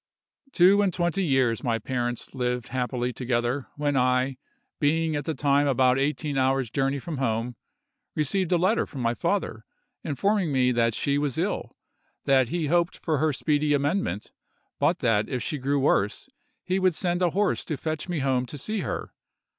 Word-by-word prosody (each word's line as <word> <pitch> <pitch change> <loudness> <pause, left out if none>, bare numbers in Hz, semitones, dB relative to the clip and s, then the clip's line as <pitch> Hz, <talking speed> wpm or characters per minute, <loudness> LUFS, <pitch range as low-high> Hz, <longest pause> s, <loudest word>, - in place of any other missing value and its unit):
"Two 195 0 +5
and 200 -2 +2
twenty 175 +2 0
years 130 -7 +1
my 115 -2 +1
parents 120 +1 -3
lived 125 -2 -2
happily 125 -1 -2
together, 125 +2 -1
when 145 -1 -1
I, 130 +1 +2 0.4
being 160 +1 +1
at 145 -1 -3
the 160 - -2
time 145 0 +2
about 130 -1 +3
eighteen 145 0 -1
hours' 130 -2 +1
journey 135 +1 0
from 145 +1 -5
home, 115 -1 -1 0.6
received 175 +5 0
a 175 - +4
letter 190 +7 +2
from 135 - -7
my 115 0 +1
father 120 - -2 0.4
informing 190 +3 0
me 130 -2 +3
that 115 -2 +1
she 140 0 0
was 145 -3 -1
ill—that 130 -2 -2
he 170 0 -1
hoped 170 +3 +1
for 155 -4 -1
her 155 +1 +2
speedy 150 +1 +1
amendment—but 140 - -2
that 105 -2 +2
if 125 -4 -2
she 150 - -3
grew 140 +2 0
worse 105 -7 +1 0.4
he 185 +1 0
would 185 -3 +2
send 175 0 -1
a 180 - +3
horse 200 +4 0
to 155 - -3
fetch 155 +3 -4
me 170 -5 -1
home 130 -2 +1
to 145 - -8
see 215 +10 -3
her. - - -4
140 Hz, 170 wpm, -26 LUFS, 125-160 Hz, 0.6 s, Two